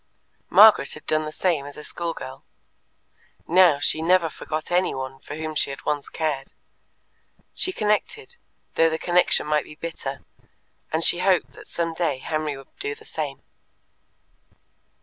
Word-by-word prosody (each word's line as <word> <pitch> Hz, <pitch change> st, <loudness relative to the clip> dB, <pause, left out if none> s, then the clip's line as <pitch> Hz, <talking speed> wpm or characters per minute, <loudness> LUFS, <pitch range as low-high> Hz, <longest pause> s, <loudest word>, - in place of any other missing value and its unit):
Margaret 210 Hz, -10 st, +7 dB
had 155 Hz, -, -11 dB
done 155 Hz, 0 st, +1 dB
the 155 Hz, -, -5 dB
same 155 Hz, -4 st, 0 dB
as 145 Hz, -, -10 dB
a 150 Hz, -, -8 dB
schoolgirl. 165 Hz, -7 st, -5 dB, 1.0 s
Now 175 Hz, -3 st, +6 dB
she 155 Hz, +2 st, 0 dB
never 170 Hz, -1 st, +3 dB
forgot 155 Hz, +1 st, -5 dB
anyone 135 Hz, -7 st, 0 dB
for 145 Hz, -, -8 dB
whom 155 Hz, 0 st, -4 dB
she 150 Hz, -, +1 dB
had 135 Hz, -1 st, -8 dB
once 145 Hz, -2 st, -1 dB
cared; 150 Hz, -4 st, -3 dB, 1.0 s
she 370 Hz, -, 0 dB
connected, 375 Hz, -, -1 dB, 0.4 s
though 165 Hz, 0 st, +4 dB
the 160 Hz, -, -1 dB
connection 175 Hz, -1 st, +2 dB
might 150 Hz, -1 st, +1 dB
be 150 Hz, -, -12 dB
bitter, 150 Hz, -4 st, -6 dB, 0.7 s
and 160 Hz, +1 st, 0 dB
she 175 Hz, -, +3 dB
hoped 185 Hz, -1 st, +2 dB
that -, -, -13 dB
some 165 Hz, -1 st, -2 dB
day 160 Hz, -5 st, 0 dB
Henry 155 Hz, +1 st, -3 dB
would 135 Hz, -, -15 dB
do 425 Hz, +1 st, -3 dB
the 445 Hz, 0 st, -16 dB
same. -, -, -5 dB
160 Hz, 150 wpm, -24 LUFS, 145-180 Hz, 1.0 s, Margaret